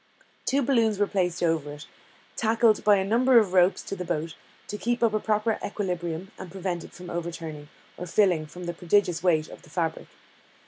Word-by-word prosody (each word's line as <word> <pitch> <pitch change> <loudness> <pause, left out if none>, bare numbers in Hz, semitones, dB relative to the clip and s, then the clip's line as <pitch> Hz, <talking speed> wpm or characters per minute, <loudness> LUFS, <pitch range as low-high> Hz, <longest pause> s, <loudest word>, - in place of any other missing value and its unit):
Two 275 +1 +2
balloons 230 -5 +2
were 205 - +3
placed 180 -3 -1
over 160 -3 0
it, 150 +1 -10 0.5
tackled 225 0 +3
by 210 -1 +6
a 190 -1 0
number 245 +5 +4
of 205 -5 +4
ropes 185 +1 +4
to - - -5
the 180 - -5
boat, 160 -1 -3 0.3
to - - -5
keep 240 +3 -1
up 225 -2 +3
a 215 - +2
proper 215 +1 0
equilibrium, 180 -2 -3
and 190 - -7
prevent 180 -1 -4
it - - -12
from 180 0 -10
overturning, 165 -3 -5 0.3
or 180 - -6
filling, 175 -4 +2
from 180 +4 -10
the 175 0 -3
prodigious 175 0 +1
weight 160 -4 +2
of - - -12
the 170 - -18
fabric. 165 +1 -2
180 Hz, 195 wpm, -26 LUFS, 170-215 Hz, 0.5 s, by